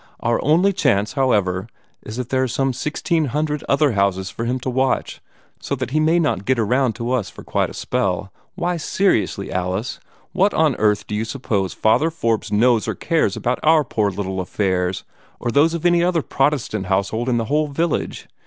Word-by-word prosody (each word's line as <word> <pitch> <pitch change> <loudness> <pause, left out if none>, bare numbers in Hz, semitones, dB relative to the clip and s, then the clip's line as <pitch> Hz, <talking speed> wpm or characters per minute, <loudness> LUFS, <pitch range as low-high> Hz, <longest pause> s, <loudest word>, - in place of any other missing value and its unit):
Our 120 0 0
only 175 +7 +3
chance, 105 - +1
however, 100 -8 +1 0.3
is 110 +2 -8
that 125 -1 -4
there 130 -1 +1
are 130 - +1
some 135 +2 0
sixteen 155 +4 -1
hundred 150 +2 -2
other 140 0 +3
houses 100 -2 0
for 115 - -4
him 125 +2 -1
to 130 - -2
watch, 130 0 0 0.4
so 140 - -3
that 130 -2 -4
he 155 - +2
may 160 +2 +3
not 150 - 0
get 130 -1 +2
around 125 +2 +1
to 115 +3 -4
us 125 -6 0
for - - -12
quite - - 0
a - - -10
spell. 100 -6 -2 0.2
Why, 175 -1 -1
seriously, 170 - 0
Alice, 95 +5 -2 0.3
what 200 +2 +2
on 155 -5 +3
earth 105 -1 +2
do - - -7
you 105 +1 0
suppose 110 -6 -2
Father 130 +9 +3
Forbes 115 -9 -1
knows 115 +1 +3
or - - -2
cares 160 - 0
about 125 +1 -1
our 155 0 +4
poor 110 -5 0
little 95 -1 -4
affairs, 90 -1 -1 0.4
or 120 - -2
those 160 +6 +3
of 170 - -5
any 175 -1 +4
other 175 -3 +1
Protestant 125 -7 0
household 100 +6 0
in 120 - +2
this 115 -1 -1
whole 150 +1 +2
village? 160 +3 -2
125 Hz, 195 wpm, -21 LUFS, 105-150 Hz, 0.4 s, our